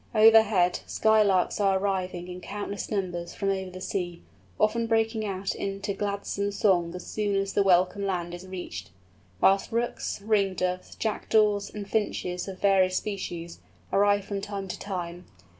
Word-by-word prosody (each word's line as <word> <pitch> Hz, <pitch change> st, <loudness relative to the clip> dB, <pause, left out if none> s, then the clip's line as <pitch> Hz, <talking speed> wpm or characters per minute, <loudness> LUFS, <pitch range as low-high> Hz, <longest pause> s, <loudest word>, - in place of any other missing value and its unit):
Overhead, 215 Hz, -5 st, +6 dB
Sky 220 Hz, 0 st, +4 dB
Larks 195 Hz, -2 st, +2 dB
are 195 Hz, -2 st, +3 dB
arriving 185 Hz, -2 st, -2 dB
in 180 Hz, 0 st, -7 dB
countless 200 Hz, 0 st, -5 dB
numbers 175 Hz, -4 st, -3 dB
from 195 Hz, -, -1 dB
over 190 Hz, -1 st, -3 dB
the 185 Hz, 0 st, -9 dB
sea, 175 Hz, -2 st, -4 dB, 0.4 s
often 230 Hz, +2 st, +2 dB
breaking 225 Hz, -1 st, +1 dB
out 195 Hz, 0 st, -2 dB
into 200 Hz, +1 st, -3 dB
gladsome 200 Hz, 0 st, -2 dB
song 180 Hz, -4 st, +2 dB
as 180 Hz, -, -7 dB
soon 205 Hz, -2 st, -1 dB
as 195 Hz, 0 st, 0 dB
the -, -, +3 dB
welcome 190 Hz, +1 st, +3 dB
land 175 Hz, -2 st, -2 dB
is 175 Hz, +1 st, -8 dB
reached; 175 Hz, -, -6 dB, 0.5 s
whilst 195 Hz, +4 st, +4 dB
Rooks, 235 Hz, -1 st, -2 dB
Ring 200 Hz, -2 st, +1 dB
Doves, 180 Hz, 0 st, -2 dB
Jackdaws, 210 Hz, -1 st, +1 dB
and 205 Hz, -2 st, -7 dB
Finches 190 Hz, -4 st, -1 dB
of 190 Hz, -1 st, -6 dB
various 190 Hz, -2 st, +3 dB
species, 175 Hz, -5 st, -5 dB, 0.3 s
arrive 205 Hz, 0 st, +3 dB
from 200 Hz, -1 st, -3 dB
time 200 Hz, -1 st, -5 dB
to -, -, -5 dB
time. 180 Hz, -3 st, -5 dB
195 Hz, 160 wpm, -27 LUFS, 180-205 Hz, 0.5 s, Overhead